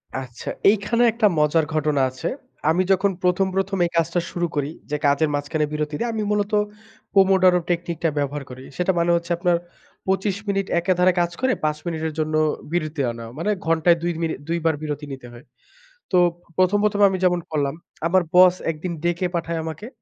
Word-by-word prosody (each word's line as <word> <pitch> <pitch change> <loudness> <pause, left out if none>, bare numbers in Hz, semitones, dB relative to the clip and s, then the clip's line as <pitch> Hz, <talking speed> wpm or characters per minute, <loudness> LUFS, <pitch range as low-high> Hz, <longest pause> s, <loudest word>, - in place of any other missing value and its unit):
আচ্ছা, 130 -2 -6 0.2
এইখানে 220 +3 +2
একটা 220 -1 +3
মজার 150 +1 +3
ঘটনা 150 -2 +1
আছে। 130 0 -5 0.4
আমি 175 +4 +3
যখন 195 +1 +3
১ম, 180 +1 +2
১ম 195 0 0
এই 170 - -3
কাজটা 165 +1 +1
শুরু 175 0 -1
করি, 145 -1 -1 0.2
যে 150 - -1
কাজের 145 +2 +3
মাঝখানে 150 +2 -1
বিরতি 150 0 -2
দিয়ে 235 - -1
আমি 220 -1 -2
মূলত 205 0 0 0.6
পোমোডরো 190 -2 +5
টেকনিকটা 170 -1 -1
ব্যবহার 145 0 -2
করি। 130 +1 -10
সেটা 180 +1 +2
মানে 170 0 +2
হচ্ছে 170 +1 -3
আপনার, 175 0 +2 0.5
২৫ 190 +1 0
মিনিট 195 -1 0
একে 180 +2 +1
ধারে 180 +1 +5
কাজ 175 0 0
করে 260 -1 +2
৫ 150 0 +1
মিনিটের 160 -2 -3
জন্য 155 0 -1 0.4
বিরতি 155 -3 -1
আনা। 115 0 -8
মানে, 190 +7 0
ঘন্টায় 165 +1 +3
২ 175 0 0
মিনি 165 -1 0
২ 170 +1 0
বার 160 -1 +3
বিরতি 150 -1 -4
নিতে 130 -2 -9
হয়। 120 +3 -13 0.7
তো 185 - +4 0.4
১ম, 185 +2 +4
১ম 210 -1 +1
এ, - - +9
আমি 190 - -1
যেমন 180 -1 +3
করলাম, 145 -2 0 0.3
আমার 185 +2 +3
বস 180 0 +7 0.2
একদিন 165 +3 -5
ডেকে 175 +1 0
পাঠায় 170 -1 -2
আমাকে 160 +7 -6
170 Hz, 185 wpm, -22 LUFS, 155-185 Hz, 0.7 s, এ